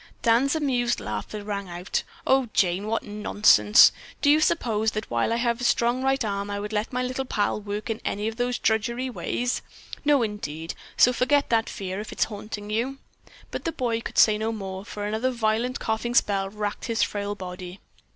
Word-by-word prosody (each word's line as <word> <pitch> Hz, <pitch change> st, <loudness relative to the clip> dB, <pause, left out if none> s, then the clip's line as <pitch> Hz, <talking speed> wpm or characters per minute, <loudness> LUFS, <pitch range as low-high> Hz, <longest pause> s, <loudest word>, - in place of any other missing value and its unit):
Dan's 245 Hz, +5 st, +3 dB
amused 250 Hz, -6 st, +1 dB
laughter 105 Hz, -, -5 dB
rang 200 Hz, -2 st, -4 dB
out. 175 Hz, +2 st, -2 dB, 0.2 s
"Oh, 265 Hz, -3 st, +3 dB
Jane, 185 Hz, +2 st, +2 dB
what 225 Hz, +1 st, -1 dB
nonsense. 210 Hz, +1 st, +5 dB, 0.3 s
Do 285 Hz, -, +6 dB
you 305 Hz, -, +5 dB
suppose 225 Hz, -9 st, +1 dB
that 215 Hz, -, -4 dB
while 120 Hz, -, +1 dB
I -, -, +2 dB
have 235 Hz, 0 st, 0 dB
a -, -, -3 dB
strong 240 Hz, +1 st, +2 dB
right 270 Hz, -2 st, +1 dB
arm 200 Hz, -1 st, -2 dB
I 205 Hz, 0 st, -3 dB
would 210 Hz, +1 st, -5 dB
let 210 Hz, +1 st, -1 dB
my 250 Hz, 0 st, -1 dB
little 255 Hz, +1 st, -2 dB
pal 210 Hz, -4 st, -1 dB
work 205 Hz, +1 st, -4 dB
in 225 Hz, -1 st, -3 dB
any 205 Hz, +2 st, -2 dB
of 225 Hz, 0 st, -4 dB
those 245 Hz, 0 st, 0 dB
drudgery 235 Hz, +4 st, 0 dB
ways? 245 Hz, 0 st, -2 dB, 0.4 s
No, 290 Hz, -4 st, +4 dB
indeed, 165 Hz, -7 st, -4 dB, 0.2 s
so 250 Hz, -, +6 dB
forget 280 Hz, +3 st, +2 dB
that 225 Hz, -1 st, +2 dB
fear, 190 Hz, 0 st, -5 dB
if 215 Hz, -, -6 dB
it's -, -, +1 dB
haunting 210 Hz, 0 st, -6 dB
you." 245 Hz, +5 st, -1 dB, 0.5 s
But -, -, -4 dB
the 330 Hz, -, -1 dB
boy 235 Hz, -6 st, -1 dB
could -, -, -7 dB
say 215 Hz, -1 st, +6 dB
no 220 Hz, +1 st, -1 dB
more, 195 Hz, -3 st, -5 dB
for 205 Hz, 0 st, -6 dB
another 220 Hz, +5 st, 0 dB
violent 235 Hz, +1 st, 0 dB
coughing 230 Hz, +2 st, -2 dB
spell 195 Hz, -3 st, +2 dB
racked 210 Hz, 0 st, -4 dB
his 230 Hz, -2 st, +1 dB
frail 205 Hz, 0 st, -2 dB
body. 180 Hz, -1 st, -8 dB
220 Hz, 195 wpm, -25 LUFS, 205-245 Hz, 0.5 s, Do